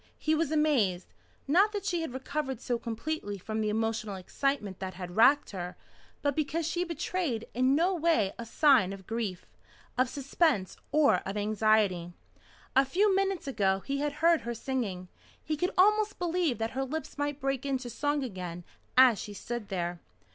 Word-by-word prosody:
He 310 - 0
was 315 -1 +1
amazed 260 - +1 0.3
not 385 +9 +4
that 410 - -3
she 345 -2 0
had 325 - -4
recovered 265 0 -3
so 240 -1 -2
completely 230 -2 -4
from 215 +4 -3
the 215 - 0
emotional 220 -1 -1
excitement 205 +1 -2
that 185 -1 -5
had 180 -1 -7
racked 275 +6 +5
her, 180 -3 -5 0.5
but 285 -2 +1
because 315 +1 -1
she 345 +2 0
betrayed 335 -7 -2
in 255 +3 +3
no 350 +5 +3
way 320 - +2
a - - -3
sign 255 -8 +4
of 195 -1 -10
grief 220 -5 -3 0.5
of 255 -1 +3
suspense 275 - 0 0.2
or 300 -1 +5
of 195 +2 -5
anxiety. 210 -4 +2 0.6
A 270 - +7
few 380 +9 +2
minutes 390 -5 0
ago 195 -7 +1
he 275 +5 -3
had 295 0 -1
heard 330 +2 +3
her 235 0 -4
singing. 220 -8 -3 0.4
He 310 - -1
could 360 +4 0
almost 425 +2 +4
believe 345 -6 0
that 225 +1 -2
her 270 - -2
lips 300 +2 -5
might 290 0 -1
break 270 -2 -1
into 265 -3 -2
song 290 +3 -1
again 180 -7 -6 0.3
as 255 -5 +7
she 205 - -7
stood 240 0 -5
there. 175 -2 -2
260 Hz, 175 wpm, -29 LUFS, 210-310 Hz, 0.6 s, A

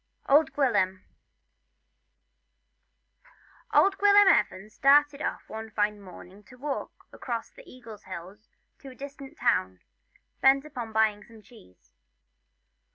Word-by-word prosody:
OLD 290 +2 +4
GWILYM. 200 -9 0 2.7
OLD 390 0 +3
Gwilym 410 0 +6
Evans 195 +3 -2
started 290 +2 +3
off - - -4
one 220 0 -8
fine 210 -1 -1
morning 190 +1 -14
to 250 - -16
walk 275 +1 -6
across 235 -2 -5
the - - -16
Eagle 230 -4 -12
Hills 190 +2 -11 0.3
to 275 - -11
a 255 - -13
distant 280 +2 -10
town, 95 - 0 0.6
bent 270 +2 +4
upon 250 -7 -7
buying 215 -1 +1
some 225 -1 -17
cheese. 205 - -21
235 Hz, 115 wpm, -27 LUFS, 205-280 Hz, 2.7 s, Gwilym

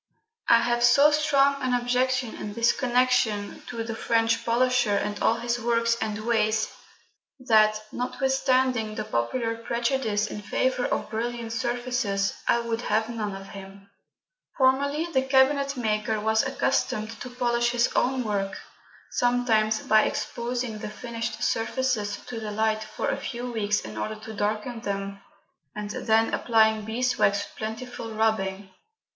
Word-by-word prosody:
I 235 - +7
have 240 0 +1
so 280 +5 +6
strong 280 -2 +3
an 255 -1 +1
objection 250 0 0
in 205 - -6
this 230 +2 +3
connection 245 -5 +1
to 230 -2 -4
the 225 0 -4
French 225 0 +1
polisher 245 -2 +2
and 205 +1 -2
all 225 - +3
his 235 +1 -2
works 230 0 +1
and 210 -1 -2
ways, 220 -2 +1 0.7
that, 215 -4 +4
notwithstanding 255 -3 0
the 215 - -3
popular 225 - -1
prejudice 235 -2 -1
in 210 0 -6
favour 255 +4 0
of - - -2
brilliant 230 0 -3
surfaces, 240 -4 -1
I 235 - +3
would 230 0 -3
have 220 -1 0
none 215 -4 -3
of 195 0 -9
him. 195 0 -11 0.7
Formerly 280 +4 +2
the 265 - +3
cabinetmaker 265 -5 +1
was 220 +1 +2
accustomed 265 -5 -1
to 250 - -6
polish 240 -1 +1
his 240 0 +2
own 255 0 +1
work, 200 -3 -2 0.5
sometimes 230 -3 +2
by 215 0 +4
exposing 240 -2 -3
the - - -5
finished 230 +1 -5
surfaces 225 -3 0
to 235 - -6
the 215 -1 -5
light 220 +1 0
for 215 - -4
a - - -1
few 245 -1 -5
weeks 210 -2 0
in 110 0 -7
order 105 - -3
to 220 +1 -9
darken 215 +3 -2
them, 200 -2 -4 0.5
and 210 0 -5
then 225 +1 +1
applying 220 -2 +3
beeswax 220 -3 +1
with - - -13
plentiful 225 +1 -6
rubbing. 200 -3 0
230 Hz, 145 wpm, -26 LUFS, 215-250 Hz, 0.7 s, I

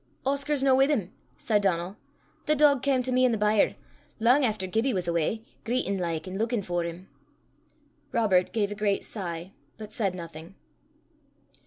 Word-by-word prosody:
"Oscar's 280 +1 +1
no 270 -1 +5
wi' 265 +1 +5
im," 205 -11 0 0.3
said 210 -2 +1
Donal. 185 -1 0 0.5
"The 305 - +3
dog 285 -3 +4
cam 265 -2 +1
to 255 - -2
me 255 0 +3
i' 255 - +5
the 230 - 0
byre, 210 0 +2 0.4
lang 250 +6 +4
efter 215 -5 0
Gibbie 225 +6 0
was 180 -2 -2
awa, 170 +5 0 0.3
greitin' 225 -5 -1
like, 165 -1 -3
an' 190 +2 -5
luikin' 225 -1 0
for 175 -1 -1
'im." 170 +3 -7 1.0
Robert 190 -6 +2
gave 205 -1 0
a - - -1
great 205 -1 0
sigh, 175 -3 -5 0.3
but 215 -1 -9
said 200 -4 -1
nothing. 165 +1 -9
210 Hz, 170 wpm, -27 LUFS, 180-250 Hz, 1.0 s, no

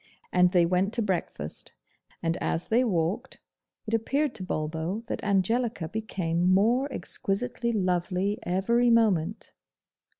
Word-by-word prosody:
And 180 0 +5
they 175 -2 +4
went 185 +4 +1
to 235 - +1
breakfast; 170 - -3 0.5
and 165 0 +1
as 165 - -2
they 235 +3 +4
walked, 195 +3 -1 0.5
it 220 - -4
appeared 270 +5 +1
to 190 - -3
Bulbo 160 +5 -3
that - - -4
Angelica 210 0 +1
became 180 -4 -1
more 235 +9 +3
exquisitely 235 +2 -2
lovely 185 +1 0
every 235 +7 +2
moment. 215 -9 +2
195 Hz, 125 wpm, -27 LUFS, 175-230 Hz, 0.5 s, And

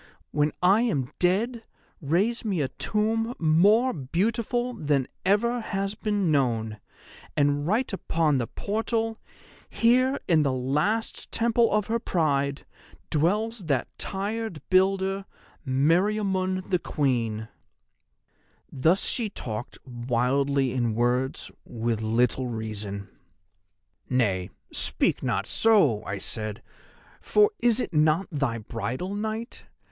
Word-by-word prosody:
When 150 0 +1
I 195 +5 +5
am 145 - 0
dead, 225 +7 +1 0.4
raise 185 +11 +1
me 200 -6 -1
a 135 - -1
tomb 225 - -1
more 200 +11 +4
beautiful 230 - -1
than 145 - 0 0.2
ever 235 +6 +2
has 195 -2 -2
been 205 -5 0
known, 115 -7 0 0.6
and 145 +1 +2
write 225 +4 0
upon 160 -6 +1
the 120 - -2
portal, 225 +1 -2 0.5
Here, 255 +4 +3
in 165 -3 +4
the 140 -2 +1
last 150 - -1
temple 230 0 +2
of 210 -1 +2
her 230 +2 0
pride, 140 -8 0 0.5
dwells 205 +7 0
that 140 -5 -1
tired 205 -2 -3
builder, 190 +1 +2 0.4
Meriamun, 185 +6 +1
the 180 - +3
Queen.' 115 -9 -1 1.2
"Thus 160 +8 +2
she 230 -4 -1
talked 115 - -6
wildly 130 +2 0
in 120 -4 0
words 125 +3 0
with 115 -1 -2
little 120 +3 +1
reason. 105 -3 -5 1.0
"'Nay, 100 -8 +1 0.2
speak - - +1
not - - -1
so,' 170 - +3
I 95 - -3
said, 110 +2 -4 0.6
'for 420 0 +4
is 240 0 +3
it 245 - -3
not 155 +4 +3
thy 140 -6 -1
bridal 125 - -4
night? 220 +4 -5
165 Hz, 115 wpm, -26 LUFS, 130-215 Hz, 1.2 s, I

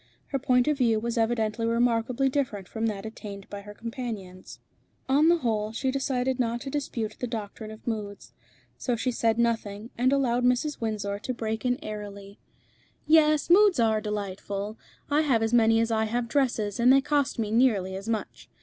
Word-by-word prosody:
Her 275 - -1
point 250 0 +2
of 300 -2 +1
view 230 -3 +3
was 235 +1 -3
evidently 225 -1 0
remarkably 235 +2 +1
different 250 -9 -2
from 225 0 -2
that 205 -2 -4
attained 205 -3 -8
by 205 0 -6
her 205 +1 -11
companions. 225 -6 -7 0.5
On 290 +5 +4
the 345 - +5
whole, 220 -7 -1
she 260 +3 -1
decided 260 -1 -1
not 235 -1 0
to 270 -1 -6
dispute 230 -7 -3
the 250 - -2
doctrine 215 -1 -6
of 220 0 -11
moods. 210 -3 -5 0.5
So 245 - 0
she 250 +3 -1
said 230 -1 +1
nothing, 225 -2 -1
and 255 +2 +3
allowed 250 -3 +2
Mrs. 250 +4 +1
Windsor 205 -2 -2
to 255 +4 -4
break 220 0 -3
in 250 0 +2
airily 205 -2 -8 0.7
"Yes, 305 -1 +4
moods 380 -2 +5
are 220 -2 +3
delightful. 205 0 -4 0.4
I 295 +2 +4
have 255 -7 +2
as 225 +1 -1
many 225 -1 +5
as 230 0 +1
I 220 0 +2
have 235 +2 -1
dresses, 230 -6 0
and 245 +2 +6
they 275 +1 +6
cost 285 0 0
me 215 -2 -2
nearly 215 -6 +2
as 195 +3 -6
much. 220 -2 -4
230 Hz, 185 wpm, -27 LUFS, 215-255 Hz, 0.7 s, and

